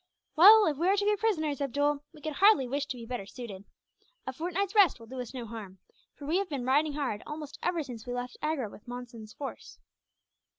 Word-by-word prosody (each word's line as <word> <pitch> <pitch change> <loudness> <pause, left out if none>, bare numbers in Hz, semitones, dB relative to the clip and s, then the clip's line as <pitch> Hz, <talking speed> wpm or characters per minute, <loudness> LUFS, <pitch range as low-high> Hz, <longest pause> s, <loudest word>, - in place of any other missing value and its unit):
"Well, 415 +6 +9
if 300 -5 0
we 340 +4 +1
are 395 +2 +4
to 405 - +1
be 420 0 +3
prisoners, 315 - -1
Abdool, 285 +2 0
we 305 - -16
could 310 0 -4
hardly 395 -10 +5
wish 280 +3 -2
to 255 - -5
be 230 - -8
better 230 -5 -5
suited. 210 -5 -9 0.6
A 260 - -4
fortnight's 360 +6 -2
rest 400 - +5
will 230 - -12
do 255 +2 -6
us 245 - -7
no 250 -3 -6
harm, 210 -4 -9 0.4
for 285 - -10
we 320 +5 +1
have 395 -2 -3
been 275 -5 -3
riding 290 +3 +2
hard 275 -8 -2
almost 300 -1 -7
ever 345 -3 0
since 245 -4 -9
we 245 - -3
left 245 0 -5
Agra 305 -6 -1
with 210 - -14
Monson's 240 -3 -8
force." 275 -2 -8
280 Hz, 220 wpm, -29 LUFS, 245-320 Hz, 0.6 s, Well